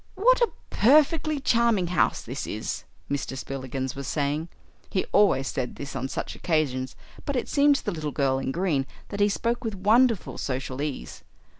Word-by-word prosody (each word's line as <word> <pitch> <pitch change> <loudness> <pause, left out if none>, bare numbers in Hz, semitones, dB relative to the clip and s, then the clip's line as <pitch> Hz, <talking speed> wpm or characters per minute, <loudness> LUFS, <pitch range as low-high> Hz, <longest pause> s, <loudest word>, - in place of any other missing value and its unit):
"What - - +4
a 475 - +4 0.2
perfectly 305 +4 +4
charming 235 -7 +3
house 180 - +1
this - - -5
is," - - -4 0.2
Mr. 140 -1 -3
Spillikins 130 -1 -4
was 140 -1 -6
saying. 150 +3 -1 0.4
He 190 - 0
always 200 -10 +4
said 125 -2 -3
this 140 -1 -7
on 130 0 -2
such - - -4
occasions, 135 -6 -1 0.3
but 285 - -2
it 250 - -1
seemed 285 0 +4
to - - -4
the - - 0
Little 155 -3 -3
Girl 135 -2 +1
in 135 - -2
Green 155 -5 0 0.2
that 200 - -5
he 205 0 +4
spoke 235 +4 -1
with 220 -3 -3
wonderful 220 +2 +3
social 130 0 -3
ease. 145 -2 -5
165 Hz, 175 wpm, -26 LUFS, -, 0.4 s, What